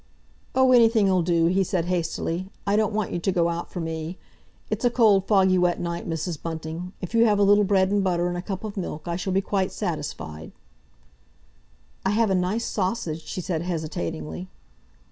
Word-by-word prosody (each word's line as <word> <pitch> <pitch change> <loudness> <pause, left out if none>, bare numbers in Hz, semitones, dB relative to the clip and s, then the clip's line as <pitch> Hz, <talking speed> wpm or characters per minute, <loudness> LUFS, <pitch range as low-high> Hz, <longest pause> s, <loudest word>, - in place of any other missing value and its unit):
"Oh, 260 0 +5
anything'll 225 -6 +5
do," 170 -1 +2
he 185 +3 +3
said 180 -2 -1
hastily. 175 +1 -2 0.2
"I 200 +1 +2
don't 215 0 +2
want 210 -1 -1
you - - -2
to 190 - 0
go 170 -2 +2
out 170 0 -4
for 180 - -6
me. 160 +1 -4 0.5
It's - - -2
a 245 - +5
cold, 215 -5 +4
foggy, 190 -3 +4
wet 180 -1 +2
night, 170 0 -4
Mrs. 165 0 -3
Bunting. 165 +2 -5
If 180 +3 -6
you 230 0 +5
have 210 -2 +3
a 205 - +4
little 205 +1 +5
bread 190 -1 +2
and 205 -1 +2
butter 175 -2 +1
and 175 - -2
a 175 - -3
cup 190 +1 -5
of 215 -2 -5
milk 165 -4 -5
I 170 - -1
shall 185 +2 -3
be 190 +1 +2
quite 195 -1 -1
satisfied." 145 - -5 1.5
"I - - +1
have 215 0 +2
a - - +3
nice 190 +5 0
sausage," 185 -5 -2
she 185 - -4
said 165 -2 -2
hesitatingly. 90 - -4
180 Hz, 195 wpm, -25 LUFS, 170-200 Hz, 1.5 s, Oh